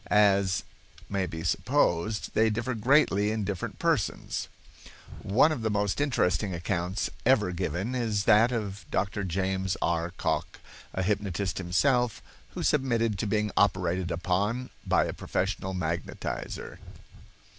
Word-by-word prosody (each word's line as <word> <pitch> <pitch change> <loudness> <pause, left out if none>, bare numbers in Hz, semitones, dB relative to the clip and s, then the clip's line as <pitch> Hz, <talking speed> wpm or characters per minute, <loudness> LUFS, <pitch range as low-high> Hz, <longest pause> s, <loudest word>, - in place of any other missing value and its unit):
As 100 -3 +3 0.5
may 95 -2 -1
be 80 -1 -6
supposed, 105 -1 +1
they 110 0 +4
differ 120 +4 -2
greatly 110 -3 +3
in 110 -1 -1
different 95 -2 -4
persons. - - -1 0.7
One 125 +10 +4
of 135 - -2
the 110 - 0
most 105 +3 0
interesting 95 - +1
accounts 90 +2 -2
ever 110 -7 +3
given 90 +6 -2
is 110 -5 0
that 110 +5 +5
of 105 -4 -3
Dr. 100 +1 -1
James 95 +1 -1
R. 85 0 0
Cocke, - - -2 0.4
a 95 - 0
hypnotist 100 -2 -1
himself, 115 +5 +1 0.3
who - - -3
submitted 115 -7 +1
to 110 - -1
being 105 0 0
operated 90 -2 +2
upon 100 +9 -1 0.2
by - - +3
a - - -3
professional 95 0 -2
magnetizer. 85 -2 -4
100 Hz, 130 wpm, -28 LUFS, 90-110 Hz, 0.7 s, that